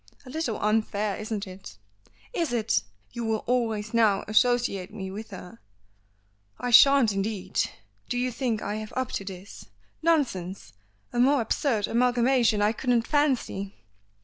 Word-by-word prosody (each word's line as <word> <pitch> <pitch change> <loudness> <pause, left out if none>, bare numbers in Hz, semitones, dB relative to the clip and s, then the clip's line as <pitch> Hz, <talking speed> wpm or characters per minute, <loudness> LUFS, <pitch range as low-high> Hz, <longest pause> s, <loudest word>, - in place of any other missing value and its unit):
"A 255 - -10
little 315 -7 -2
unfair, 210 -1 0
isn't 215 -1 -4
it?" 185 - -11 0.6
"Is 330 -6 -1
it? 225 - +1 0.3
You 235 - -5
will 220 -1 -1
always 225 -3 -1
now 220 -4 +3
associate 215 -4 +2
me 190 -3 -6
with 215 +3 -7
her!" 180 - -10 1.0
"I 245 - -2
shan't 275 -1 +7
indeed. 195 0 -1 0.5
Do 245 - -1
you 250 +1 0
think 235 -3 -2
I 210 - -3
have 215 0 -7
up 260 -2 -2
to - - -3
this? 190 +1 -9 0.4
Nonsense! 235 - 0 0.4
A 240 - -1
more 275 +3 +4
absurd 225 -1 0
amalgamation 240 -2 +2
I 210 - +3
couldn't 235 0 0
fancy." 255 -10 0
225 Hz, 145 wpm, -26 LUFS, 205-245 Hz, 1.0 s, shan't